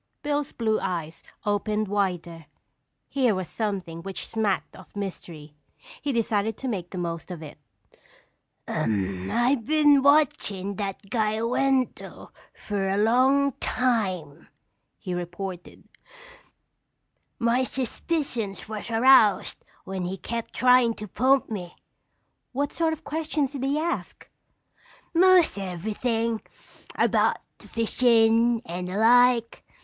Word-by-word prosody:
Bill's 290 -1 -1
blue 220 -2 0
eyes 165 -3 -4 0.2
opened 210 +1 0
wider. 175 -5 -2 0.6
Here 255 -6 +1
was 185 -2 -3
something 190 -6 -4
which 190 0 -6
smacked 215 -3 -1
of - - -15
mystery. 170 -6 -7 0.5
He 290 - -1
decided 225 -3 0
to 265 - -5
make 185 -7 -3
the 185 - -7
most 170 -1 -4
of 170 -3 -7
it. 150 0 -11 1.1
"I 105 - 0
been 295 0 +4
watchin' 210 -9 +2
that 200 0 -5
guy 215 -2 +1
Wendell 260 +2 -1 0.2
fer 200 -2 -3
a 195 - 0
long 260 +6 +3
time," 185 - -1 0.5
he 185 -4 -5
reported. 175 +1 -6 1.5
"My 240 +1 +2
suspicions 255 - -3
was 215 0 -6
aroused 230 -2 +4 0.2
when 190 -1 -4
he 185 +2 -4
kept 230 +3 -5
trying' 250 -2 +4
to 210 - -8
pump 260 +7 +2
me." 180 -5 -6 0.8
"What 285 +3 -1
sort 330 -1 +1
of 320 +1 -8
questions 300 -2 -2
did 275 -3 -5
he 275 +2 +1
ask?" 340 +2 -3 0.9
"Most 360 - +5
everything. 220 +5 -2 0.5
About - - +2 0.2
the - - -14
fishin' 230 0 +3
and 180 +1 -5
the 185 +2 -4
like. 240 +1 +4
220 Hz, 115 wpm, -25 LUFS, 190-255 Hz, 1.5 s, Most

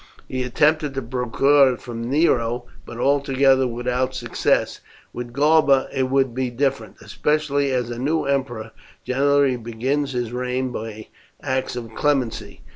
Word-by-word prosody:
He 130 - -3
attempted 150 +3 +1
to 135 - -1
procure 130 +3 +3
it - - -16
from 115 0 -6
Nero, 125 -5 +1 0.2
but 120 - -8
altogether 135 0 +3
without 125 +2 -2
success; - - 0 0.3
with 120 0 -6
Galba 140 0 +3
it 130 -1 0
will 135 0 +3
be 130 +1 -2
different, 135 +2 -2
especially 145 -2 0
as 125 -2 -1
a 120 - -5
new 155 +5 0
emperor 120 -5 -2 0.3
generally 140 0 +2
begins 130 +5 -2
his 120 -2 -2
reign 125 +1 -2
by 110 -2 -7 0.3
acts 130 -1 -2
of 115 -2 -7
clemency. 135 -3 -1
130 Hz, 140 wpm, -22 LUFS, 120-140 Hz, 0.3 s, procure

